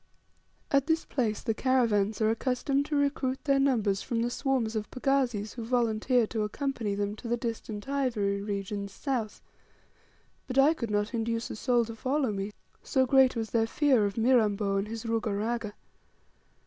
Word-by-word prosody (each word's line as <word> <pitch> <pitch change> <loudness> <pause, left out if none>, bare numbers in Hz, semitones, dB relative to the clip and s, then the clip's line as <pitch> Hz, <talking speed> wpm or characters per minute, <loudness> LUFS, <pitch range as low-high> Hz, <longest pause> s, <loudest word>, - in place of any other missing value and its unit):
At 275 0 +3
this 325 0 +1
place 225 -6 -1
the 225 - 0
caravans 225 -4 +1
are 220 0 +3
accustomed 270 +4 0
to 300 - -2
recruit 280 -2 0
their 275 -3 +3
numbers 220 -8 +2
from 230 -1 -1
the 240 - -1
swarms 250 -5 -1
of 215 -1 -3
pagazis 255 -6 0
who 235 - -6
volunteer 235 0 +2
to 220 0 -3
accompany 220 -1 -2
them 205 0 -2
to 235 - -8
the 240 +1 0
distant 225 -3 -5
ivory 230 -8 0
regions 200 0 -4
south; 235 -2 -3 1.0
but 255 - -4
I 280 +4 +6
could 235 -8 -4
not 210 +2 -1
induce 230 0 -2
a - - -5
soul 240 +1 +2
to 225 0 -8
follow 265 +1 0
me, 200 0 -3 0.3
so 265 -2 +1
great 260 0 +5
was 225 -3 -3
their 225 -1 +2
fear 255 -5 +3
of 200 - -6
Mirambo 215 -4 +2
and 195 +1 -1
his 225 +1 -6
Ruga 225 -2 -1
Raga. 225 0 -2
230 Hz, 175 wpm, -29 LUFS, 210-260 Hz, 1.0 s, I